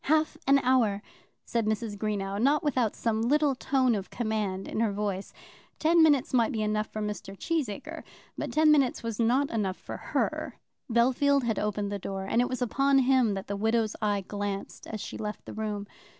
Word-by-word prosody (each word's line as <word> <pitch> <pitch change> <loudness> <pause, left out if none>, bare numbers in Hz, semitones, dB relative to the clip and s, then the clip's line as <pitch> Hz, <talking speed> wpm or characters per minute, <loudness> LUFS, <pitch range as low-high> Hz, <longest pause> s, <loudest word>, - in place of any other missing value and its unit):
"Half 310 +1 +2
an 275 0 +6
hour," 225 -6 +2 0.4
said 230 -2 -1
Mrs. 215 -1 -1
Greenow, 200 -1 -2
not 290 +6 +3
without 250 -7 +1
some 225 -1 0
little 290 +4 +3
tone 260 -1 +1
of 195 -3 -3
command 210 -5 -2
in - - -3
her 225 -2 +2
voice. 200 -1 -3 0.5
Ten 330 +2 +4
minutes 290 -6 +4
might 235 -3 +3
be 220 -2 -1
enough 215 0 0
for 215 - -5
Mr. 205 -1 -5
Cheesacre, 295 - -3 0.3
but - - -4
ten 310 0 +5
minutes 275 -6 +2
was 230 -1 -4
not 250 +5 +2
enough 200 -4 -1
for - - -7
her. - - -2 0.4
Bellfield 265 +4 +3
had 225 -2 0
opened 205 -1 -2
the 200 - -3
door, 195 0 -4
and 230 +5 +2
it 245 - 0
was 255 -1 -2
upon 275 +3 +2
him 255 -5 +3
that 195 - -5
the 200 - -3
widow's 220 +1 +1
eye 205 -2 +1
glanced 205 -1 -5
as 215 - -5
she - - -6
left 210 -1 -5
the - - -8
room. 210 -2 -3
225 Hz, 195 wpm, -28 LUFS, 205-260 Hz, 0.5 s, an